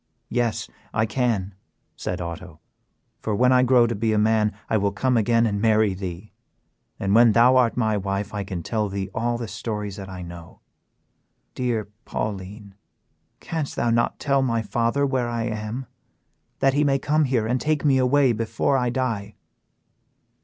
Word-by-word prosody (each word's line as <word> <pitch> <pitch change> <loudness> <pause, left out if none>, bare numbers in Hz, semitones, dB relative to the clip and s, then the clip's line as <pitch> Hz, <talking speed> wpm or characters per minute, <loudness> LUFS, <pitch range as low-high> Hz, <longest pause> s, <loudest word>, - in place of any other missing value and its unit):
"Yes, 120 -2 -1 0.3
I 110 - +3
can," 110 -5 -1 0.4
said - - -4
Otto, 85 -1 -7 0.6
"for 110 - -2
when 125 +4 +4
I 125 0 +5
grow 125 -1 +5
to 115 - -1
be 110 +1 0
a - - +2
man 105 0 +3 0.2
I - - 0
will 100 -1 +1
come 125 +6 0
again 115 +1 +3
and 100 -2 -1
marry 110 -2 +3
thee, 95 +1 -7 0.7
and 100 0 0
when 115 0 +6
thou 120 +3 +6
art 125 -2 +3
my 110 -3 +1
wife 100 +1 -3
I 105 -1 -2
can 95 -4 -5
tell 110 0 -1
thee 95 0 -4
all 120 +1 -1
the 120 -1 -5
stories 105 -1 -5
that 95 -1 -8
I 90 -1 -7
know. 85 -1 -11 0.9
Dear 120 -5 -1 0.2
Pauline, 100 0 -5 0.7
canst 160 -4 -4
thou 120 - +1
not 120 +1 +1
tell 140 -1 +1
my 115 -3 0
father 120 +6 0
where 130 -3 0
I 115 -1 -2
am, 110 +3 -4 0.8
that 135 -1 +4
he 145 +2 +2
may 140 -2 +3
come 150 +3 +1
here 125 -5 +1
and 125 +3 0
take 155 -1 0
me 135 -2 +4
away 130 +1 +4
before 115 +4 0
I 125 -1 0
die?" 120 -5 -2
115 Hz, 175 wpm, -24 LUFS, 100-125 Hz, 0.9 s, when